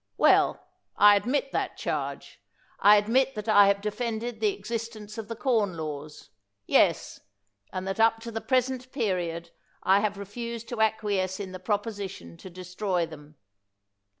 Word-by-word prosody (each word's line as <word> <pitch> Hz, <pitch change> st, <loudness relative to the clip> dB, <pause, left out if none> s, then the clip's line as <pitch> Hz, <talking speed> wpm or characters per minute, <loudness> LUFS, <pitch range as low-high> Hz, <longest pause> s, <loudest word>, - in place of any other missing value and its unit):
Well, -, -, +4 dB, 0.4 s
I 205 Hz, 0 st, +8 dB
admit 260 Hz, +7 st, 0 dB
that -, -, -2 dB
charge -, -, -4 dB, 0.2 s
— -, -, -34 dB
I 205 Hz, +1 st, +7 dB
admit 245 Hz, +6 st, +2 dB
that 210 Hz, +1 st, -6 dB
I 205 Hz, -2 st, +7 dB
have 200 Hz, 0 st, +2 dB
defended 225 Hz, +2 st, -3 dB
the 430 Hz, -, +2 dB
exist 230 Hz, -, -5 dB
ence 215 Hz, +1 st, -9 dB
of 220 Hz, -, -6 dB
the 230 Hz, -, -5 dB
Corn 220 Hz, -7 st, 0 dB
Laws 150 Hz, -1 st, -7 dB, 0.2 s
— 100 Hz, 0 st, -54 dB
yes, -, -, +2 dB, 0.5 s
and 185 Hz, 0 st, -4 dB
that 195 Hz, +2 st, -3 dB
up 225 Hz, 0 st, +4 dB
to 230 Hz, 0 st, -7 dB
the 225 Hz, 0 st, -4 dB
present 255 Hz, 0 st, 0 dB
period 175 Hz, -, -2 dB, 0.3 s
I 190 Hz, +1 st, +5 dB
have 205 Hz, -1 st, -1 dB
refused 230 Hz, +3 st, -6 dB
to 240 Hz, -3 st, -3 dB
acquiesce 205 Hz, -4 st, 0 dB
in 195 Hz, -2 st, -6 dB
the 185 Hz, -, -7 dB
proposition 200 Hz, -, -4 dB
to -, -, -11 dB
destroy 185 Hz, 0 st, -2 dB
them. 150 Hz, -1 st, -13 dB
210 Hz, 165 wpm, -27 LUFS, 185-230 Hz, 0.5 s, I